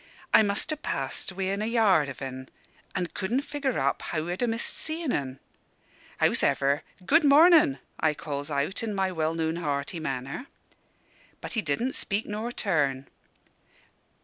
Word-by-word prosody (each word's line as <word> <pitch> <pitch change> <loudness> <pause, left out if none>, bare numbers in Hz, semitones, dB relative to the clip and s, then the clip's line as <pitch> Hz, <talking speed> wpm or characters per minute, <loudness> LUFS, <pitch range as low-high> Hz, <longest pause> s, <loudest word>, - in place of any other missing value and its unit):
I - - +8
must 205 +7 0
ha' 310 0 -4
passed - - -3
within 195 +2 -2
a 215 - -1
yard 205 - +3
of 135 - -7
en, 130 0 -6 0.5
an' 185 -2 0
couldn' 210 +7 0
figure 290 -1 -2
it 255 - -1
up 140 +1 0
how 155 0 -3
I'd 180 +5 -3
a 245 - +2
missed 230 0 -1
seein' 320 -3 -1
en. 135 - -2 0.8
Hows'ever, 140 +1 +2 0.2
'Good 325 - +5
mornin'!' 300 - +6 0.2
I 155 -1 +2
calls 145 -1 -5
out, 145 +6 -1
in 220 -3 -3
my 190 -1 0
well 160 -2 -1
known 160 0 -1
hearty 145 0 -2
manner. 135 - -4 0.9
But - - -7
he 225 - +1
didn' 220 - -1
speak 205 +2 -2
nor 215 +3 -4
turn. 145 - 0
185 Hz, 160 wpm, -27 LUFS, 145-230 Hz, 0.9 s, I